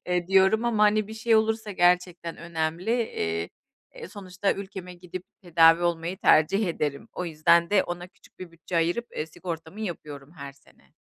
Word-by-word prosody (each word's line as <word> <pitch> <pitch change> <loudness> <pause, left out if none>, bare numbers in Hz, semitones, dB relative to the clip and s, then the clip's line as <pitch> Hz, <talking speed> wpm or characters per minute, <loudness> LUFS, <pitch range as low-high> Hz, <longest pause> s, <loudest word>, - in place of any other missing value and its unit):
Eee, 180 -1 0
diyorum 195 +4 +4
ama, 225 -3 +1
hani, 210 0 +3
bir 220 - -7
şey 225 +1 +1
olursa 220 0 0
gerçekten 175 -2 +1
önemli. 170 +3 -3
Eee, 85 - -2 0.4
e, - - -9
sonuçta 195 -1 -2
ülkeme 190 -2 -8
gidip 180 +1 -9 0.2
tedavi 165 -1 +5
olmayı 170 +2 -1
tercih 195 +7 +4
ederim. 145 -4 -3
O 180 - -4
yüzden 170 +1 +3
de 205 -2 +4
ona 175 0 -6
küçük - - -24
bir 185 -2 -9
bütçe 170 +1 -6
ayırıp, 175 +9 0
eee, 155 - -2
sigortamı 165 +4 -7
yapıyorum 150 -7 -7
her 140 -4 -9
sene. 140 0 -26
175 Hz, 170 wpm, -26 LUFS, 165-200 Hz, 0.4 s, tedavi